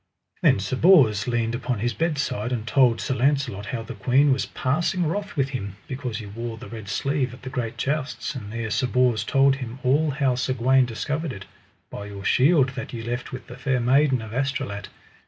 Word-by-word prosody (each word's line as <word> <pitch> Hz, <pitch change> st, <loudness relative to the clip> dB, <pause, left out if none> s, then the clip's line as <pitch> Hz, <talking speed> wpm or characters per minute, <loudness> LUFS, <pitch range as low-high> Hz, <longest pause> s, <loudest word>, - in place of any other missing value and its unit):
Then -, -, +5 dB
Sir 100 Hz, +6 st, -2 dB
Bors 130 Hz, -, +5 dB
leaned 120 Hz, -1 st, 0 dB
upon 125 Hz, -1 st, -2 dB
his 120 Hz, +3 st, -1 dB
bedside, 140 Hz, -7 st, -1 dB
and 115 Hz, -3 st, -2 dB
told 120 Hz, -2 st, +3 dB
Sir -, -, -1 dB
Launcelot 130 Hz, -6 st, 0 dB
how 115 Hz, +1 st, -3 dB
the 115 Hz, -, -7 dB
queen 130 Hz, +7 st, +3 dB
was 130 Hz, -, -2 dB
passing 170 Hz, +7 st, 0 dB
wroth 200 Hz, +6 st, -3 dB
with 135 Hz, -1 st, +1 dB
him, 100 Hz, -7 st, -5 dB
because 130 Hz, -4 st, -4 dB
he 110 Hz, -, -7 dB
wore 115 Hz, +3 st, -6 dB
the 120 Hz, -, -10 dB
red 110 Hz, -4 st, -8 dB
sleeve 130 Hz, +2 st, -1 dB
at 130 Hz, -, -19 dB
the 130 Hz, -, -6 dB
great 120 Hz, -3 st, -3 dB
jousts; 145 Hz, +1 st, -2 dB
and 105 Hz, -7 st, -7 dB
there 115 Hz, -1 st, -4 dB
Sir 130 Hz, +3 st, +1 dB
Bors 125 Hz, -3 st, +2 dB
told 135 Hz, +3 st, +3 dB
him 125 Hz, -2 st, -6 dB
all 145 Hz, +5 st, +3 dB
how 135 Hz, -2 st, +1 dB
Sir 130 Hz, +1 st, -1 dB
Gawaine 130 Hz, +1 st, +4 dB
discovered 150 Hz, +7 st, -3 dB
it: 100 Hz, -4 st, -8 dB, 0.5 s
By 100 Hz, -, -6 dB
your 100 Hz, -1 st, -8 dB
shield 140 Hz, 0 st, +4 dB
that 130 Hz, 0 st, -7 dB
ye 115 Hz, -1 st, -5 dB
left 120 Hz, +2 st, -4 dB
with 130 Hz, -2 st, -7 dB
the 125 Hz, -, -11 dB
Fair 130 Hz, -1 st, 0 dB
Maiden 130 Hz, 0 st, +3 dB
of 110 Hz, 0 st, -8 dB
Astolat. 135 Hz, -5 st, -2 dB
125 Hz, 210 wpm, -24 LUFS, 115-135 Hz, 0.5 s, Then